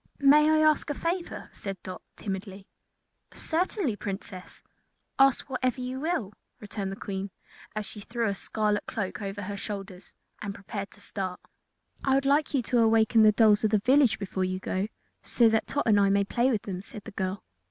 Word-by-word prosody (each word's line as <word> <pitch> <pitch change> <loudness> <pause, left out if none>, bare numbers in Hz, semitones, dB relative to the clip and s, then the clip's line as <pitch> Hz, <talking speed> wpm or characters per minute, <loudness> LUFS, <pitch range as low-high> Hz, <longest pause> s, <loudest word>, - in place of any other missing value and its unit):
"May 295 +2 +6
I 310 0 +4
ask 305 -1 +2
a 290 - -1
favor?" 340 +3 -3
said 195 -1 -5
Dot, 185 -1 -7
timidly. 195 -1 -6 0.7
"Certainly, 330 - -1
Princess; 195 -2 -7 0.6
ask 270 -1 +4
whatever 255 -1 -1
you 255 +1 -4
will," 275 - -1 0.3
returned 205 -2 -5
the - - -4
Queen, 195 -1 -4 0.5
as 215 0 -2
she 210 - -8
threw 230 +2 -2
a 200 - +1
scarlet 210 +1 -1
cloak 200 -1 -3
over 200 0 -4
her 200 +2 -4
shoulders 195 -2 -7 0.3
and 200 -1 -4
prepared 200 0 -6
to 205 - -18
start. 190 -3 -4 0.6
"I 270 -1 +3
would 275 0 +1
like 285 +2 +3
you 255 - +2
to 230 -1 +3
waken 225 0 +4
the 215 0 +7
dolls 210 -1 +5
of 215 - +3
the 215 - +4
village 250 -1 +4
before 190 -1 -3
you 185 0 -1
go, 190 +1 -2 0.3
so 235 -2 +4
that 220 0 +1
Tot 285 - -1
and 210 -2 +5
I 200 -1 +4
may 200 0 +3
play 240 +5 +1
with 220 -5 0
them," 185 -2 -5
said 205 +1 -10
the 225 - -9
girl. 190 0 -3
210 Hz, 190 wpm, -28 LUFS, 195-255 Hz, 0.7 s, the